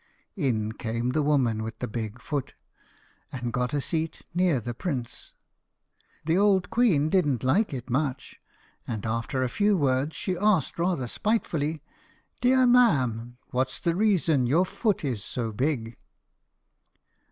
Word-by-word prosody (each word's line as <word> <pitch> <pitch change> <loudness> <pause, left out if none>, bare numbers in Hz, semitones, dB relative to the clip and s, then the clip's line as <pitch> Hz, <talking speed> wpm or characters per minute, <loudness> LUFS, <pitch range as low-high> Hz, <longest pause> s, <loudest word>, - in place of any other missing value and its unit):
In 115 - 0
came 115 +2 -2
the 155 - +1
woman 130 -7 +2
with 110 +1 -5
the - - -4
big 110 +1 -5
foot, 140 0 -4 0.8
and 120 -2 -4
got 125 +1 0
a 145 - 0
seat 160 +3 -3
near 175 -6 +2
the 120 +1 -5
prince. 130 -4 -5 0.9
The 165 +4 +2
old 195 -2 +3
queen 220 -12 +3
didn't 150 - +1
like 190 - +2
it 130 -3 -5
much, 135 +1 -2 0.5
and 110 -2 -4
after 115 +4 -1
a - - +1
few 205 - +2
words 140 0 +1
she 185 - -2
asked 205 -1 +1
rather 170 -7 0
spitefully, 160 - -1 0.6
"Dear 255 +1 +4
ma'am, 130 - +3
what's 130 +1 -1
the 170 - 0
reason 175 - +2
your 165 +9 +3
foot 200 -3 -1
is 120 -7 -2
so 115 0 -3
big?" 115 -1 -2
140 Hz, 140 wpm, -26 LUFS, 120-180 Hz, 0.9 s, Dear